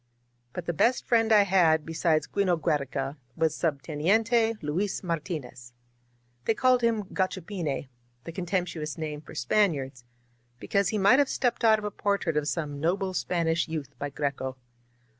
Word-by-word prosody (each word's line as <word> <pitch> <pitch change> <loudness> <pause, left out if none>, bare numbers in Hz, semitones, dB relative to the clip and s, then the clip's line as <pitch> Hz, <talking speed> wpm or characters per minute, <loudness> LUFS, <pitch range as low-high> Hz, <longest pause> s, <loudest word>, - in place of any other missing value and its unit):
But 180 - -5
the 175 - -1
best 240 - +2
friend 225 -2 +3
I 210 -2 +7
had 170 -5 +3
beside 165 -1 +1
'Gino 185 -4 +2
Giiereca 140 -2 -1 0.2
was 160 -1 +1
Subteniente 195 - +1
Luis 185 +9 -1
Martinez. 155 -8 -5 0.7
They 225 - +2
called 255 0 +3
him 230 -3 +1
Gachvr 185 -2 -1
pine 160 -9 -3 0.2
— 120 0 -40
the 165 - -7
contemptuous 175 -3 -3
name 150 -2 -4
for 155 - -13
Spaniards 135 - 0 0.3
— 120 +1 -40
^be - - -9
cause 200 -2 +3
he 215 - -1
might 205 +7 +5
have 285 - +3
stepped 245 -2 0
out 220 -1 +6
of 215 - -6
a 210 - -2
portrait 200 -6 -1
of 150 -1 0
some 150 -4 -3
noble 185 +4 0
Spanish 170 -2 0
youth 150 -4 -5
by 145 - -3
Greco. 140 -2 -3
165 Hz, 165 wpm, -27 LUFS, 150-200 Hz, 0.7 s, I